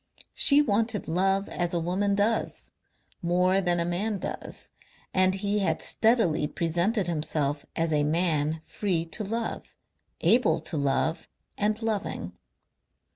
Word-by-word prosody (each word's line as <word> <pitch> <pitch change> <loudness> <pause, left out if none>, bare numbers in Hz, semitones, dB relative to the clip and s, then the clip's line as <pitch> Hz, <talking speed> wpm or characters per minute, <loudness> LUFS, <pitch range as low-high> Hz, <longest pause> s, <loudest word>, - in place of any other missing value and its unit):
She 290 +1 +5
wanted 220 -3 0
love 195 +4 +1
as 175 -1 -2
a - - +1
woman 190 +4 0
does, 210 +3 -1 0.5
more 180 +2 +2
than 175 -2 +1
a 170 - +1
man 200 +5 -1
does, - - -6 0.4
and 185 0 +4
he 200 +1 -1
had 195 - 0
steadily 220 -10 +2
presented 175 +7 0
himself 150 -3 -2
as 165 -1 0
a 150 -1 +2
man 155 -1 +1
free 180 -6 -1
to 190 +6 -4
love, 225 +3 -4 0.5
able 245 +1 +4
to 170 - -5
love 145 +3 0 0.3
and 210 +1 0
loving. 215 -3 -3
185 Hz, 130 wpm, -27 LUFS, 165-210 Hz, 0.5 s, She